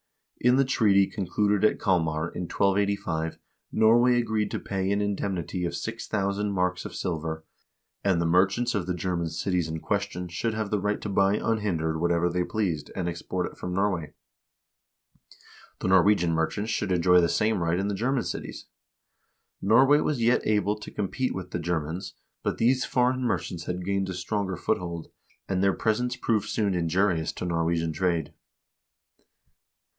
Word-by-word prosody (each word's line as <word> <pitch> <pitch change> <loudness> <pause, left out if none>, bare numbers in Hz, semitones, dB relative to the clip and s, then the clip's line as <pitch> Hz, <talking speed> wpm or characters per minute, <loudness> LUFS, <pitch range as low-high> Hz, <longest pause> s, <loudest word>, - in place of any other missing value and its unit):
In 125 +1 +5
the 135 +1 +4
treaty 105 -6 +4
concluded 105 +1 0
at 110 - +3
Kalmar 80 -4 +1
in 90 - -4
1285 100 -5 0 0.3
Norway 120 +3 +5
agreed 110 -3 0
to - - -3
pay 95 -1 -2
an 100 - +1
indemnity 95 -3 -2
of 85 0 -2
6000 105 -2 -2
marks 90 -1 0
of - - -8
silver, 80 -3 -3 0.6
and 95 -4 +2
the 85 - +1
merchants 95 +8 +2
of 95 -5 -2
the 90 - -1
German 90 -2 -2
cities 90 +1 -1
in 80 0 -4
question 100 -2 -2
should 110 +6 -2
have 110 -2 -3
the 105 - +1
right 105 +2 -1
to 105 - -4
buy 100 +1 +3
unhindered 90 -9 -1
whatever 85 0 +2
they 90 +1 0
pleased, 90 -8 -2
and 90 -2 -2
export 90 +1 -3
it - - -8
from 90 0 -5
Norway. 95 -5 -1 1.7
The - - 0
Norwegian 95 -2 +4
merchants 100 +7 -1
should 105 -2 -1
enjoy 90 0 +5
the 85 - +2
same 105 +3 +1
right 85 +1 +1
in 100 +2 -1
the 105 - -1
German 125 +5 0
cities. - - -6 1.0
Norway 130 +8 +5
was 150 -4 0
yet 120 +2 +4
able 105 -1 +2
to 105 - -8
compete 115 +6 -2
with 90 -1 -6
the 90 - -2
Ger 85 0 0
mans, 85 +6 -6 0.3
but - - -2
these 125 +3 +3
foreign 125 +1 +1
merchants 90 -7 -2
had 90 0 -4
gained 100 0 0
a 95 - -4
stronger 95 +1 -2
foothold, 85 -2 -3 0.4
and 95 -1 0
their 100 -1 +4
presence 120 +4 0
soon - - -21
proved 110 -2 0
injurious 90 -4 +1
to - - -5
Norwegian 85 -1 0
trade. 85 -2 -1
95 Hz, 165 wpm, -27 LUFS, 85-105 Hz, 1.7 s, In